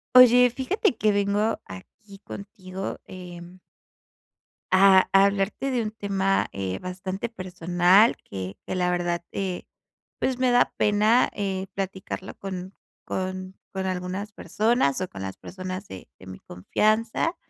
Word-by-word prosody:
Oye, 250 0 +8
fíjate 265 - 0
que 215 - +3
vengo 205 +2 +1
aquí 195 - -12
contigo, 195 -2 -7
em 180 0 -10 1.1
A 190 0 +6
a 195 0 +7
hablarte 200 +7 0
de 250 -2 +1
un 215 - -2
tema, 195 -2 0
eh, 95 -1 -3
bastante 185 +3 -4
personal 185 +1 +3
que 95 0 -6
que - - -2
la 180 -1 +1
verdad, 175 -1 -1
eh, 190 -2 -3 0.6
pues, 260 -1 0
me 255 -1 +3
da 245 0 +4
pena, 210 +4 +4
eh, 195 -2 -2
platicarlo 190 -1 -5
con 190 -1 -6 0.3
con 185 0 -4 0.2
con 190 -1 -3
algunas 185 +3 -3
personas, 215 - +1
o 185 - -1
con 95 - -9
las 95 0 -6
personas 185 +1 -7
de 95 - -10
de - - -13
mi 95 - -9
confianza. 215 - 0
190 Hz, 135 wpm, -25 LUFS, 180-215 Hz, 1.1 s, Oye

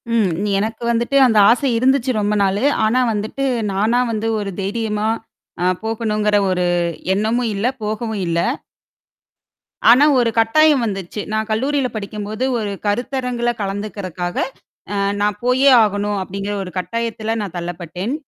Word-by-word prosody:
ம். 210 -5 +3 0.3
எனக்கு 220 +3 -3
வந்துட்டு 235 +4 -1
அந்த 220 -2 +2
ஆசை 255 +3 +3
இருந்துச்சு, 260 +1 +2
ரொம்ப 205 +1 0
நாளு. 195 +5 0 0.2
ஆனா, 235 +4 +2
வந்துட்டு 215 +6 -3 0.3
நானா 220 +5 +2
வந்து, 220 0 -2
ஒரு 200 -1 -4
தைரியமா 210 +1 -2 0.8
போகணும்னுங்கிற 215 -2 0
ஒரு 180 -1 0 0.5
எண்ணமும் 225 +4 0
இல்ல 205 +5 0
போகவும் 215 0 -3
இல்ல. 170 0 0 1.5
ஆனா, 260 +5 +7
ஒரு 235 -2 +2
கட்டாயம் 295 +5 +4
வந்துச்சு. 195 -1 -4
நான் 220 0 -1
கல்லூரியில 265 +4 0
படிக்கும்போது 210 +2 -5 0.2
ஒரு 210 -2 -3 0.2
கருத்தரங்கில 245 +2 -1
கலந்துக்கிரகாக 195 -3 -4 0.8
நான் 210 0 0
போயே 260 +3 +4
ஆகணும் 205 -1 -1
அப்படிங்கிற 195 +2 -4
ஒரு 180 - -7
கட்டாயத்தில 225 +2 -2
நான் 190 -3 -6
தள்ளப்பட்டேன். 175 - -4
215 Hz, 125 wpm, -19 LUFS, 200-235 Hz, 1.5 s, ஆனா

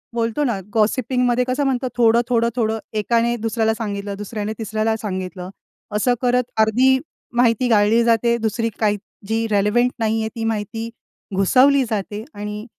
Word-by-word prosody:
बोलतो 230 +5 0
ना 235 -7 0
गॉसिपिंग 250 +3 +1
मध्ये 245 +1 +2
कसं 255 +3 0
म्हणतो 260 -1 0
थोडं-थोडं-थोडं 235 -1 +2 0.2
एकाने 235 +2 +1
दुसऱ्याला 220 0 0
सांगितलं, 205 -3 -4
दुसऱ्याने 210 +1 -4
तिसऱ्याला 220 0 -1
सांगितलं, 185 -2 -5 0.5
असं 245 +4 +2
करत 250 0 +2 0.2
अर्धी 255 +5 +4 0.4
माहिती 245 +1 +3
गाळली 220 +1 +4
जाते, 235 0 +2
दुसरी 225 +1 -1
काही, 210 -2 +2 0.3
जी 225 +1 0
रिलेवंट 210 +5 +2
नाही 225 0 +1
आहे 220 - -2
ती 225 - -4
माहिती 225 +1 -3 0.5
घुसवली 260 +8 +4
जाते 210 -1 -3
आणि 210 +1 -6
225 Hz, 140 wpm, -20 LUFS, 210-240 Hz, 0.5 s, अर्धी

